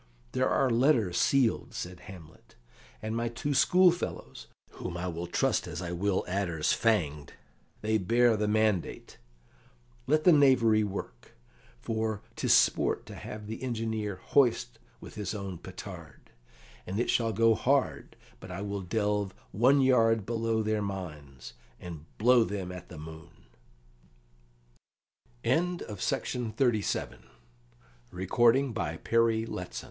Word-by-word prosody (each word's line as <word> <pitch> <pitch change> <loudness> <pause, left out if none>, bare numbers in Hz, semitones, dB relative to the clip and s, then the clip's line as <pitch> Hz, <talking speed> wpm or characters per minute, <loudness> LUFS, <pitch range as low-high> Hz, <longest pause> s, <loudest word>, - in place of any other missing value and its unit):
"There - - +1
are 135 -2 +2
letters 115 -7 +2
sealed," 120 +1 +1
said 90 0 -6
Hamlet, 90 -4 -14 0.5
"and 110 +1 -3
my 115 0 -1
two 130 +5 -3
schoolfellows, 180 +6 +2 0.2
whom 85 -1 -6
I 90 +1 -3
will 85 0 -4
trust 130 +2 0
as 85 -1 -6
I 90 -1 -4
will 95 +2 0
adders 90 -5 0
fanged 75 -11 0 0.5
they 110 0 +1
bear 115 +4 +3
the 105 0 -1
mandate. 105 -4 -1 0.9
Let 155 0 +2
the 180 - +7
knavery 125 -7 +5
work; 95 -12 -7 0.5
for 110 - -2
'tis - - 0
sport - - +3
to - - -10
have 105 0 -8
the 110 +2 -7
engineer 110 -4 -2
hoist 95 - +1 0.2
with - - -11
his 105 0 -4
own 95 -4 -6
petard, 90 -5 -10 0.6
and 95 +4 -3
it 120 - +1
shall 115 -1 +1
go 115 +2 +4
hard 135 +4 0 0.2
but 95 - -11
I 90 +2 -5
will 100 -1 -3
delve 105 0 -1 0.2
one 130 +8 +4
yard 115 -5 +3
below 115 -1 -1
their 110 0 0
mines, 75 -11 -7 0.3
and 80 -4 -9
blow 120 +2 +5
them 95 -4 -4
at 90 -1 -9
the 90 - -10
moo 80 +1 -10
105 Hz, 120 wpm, -29 LUFS, 90-115 Hz, 0.9 s, the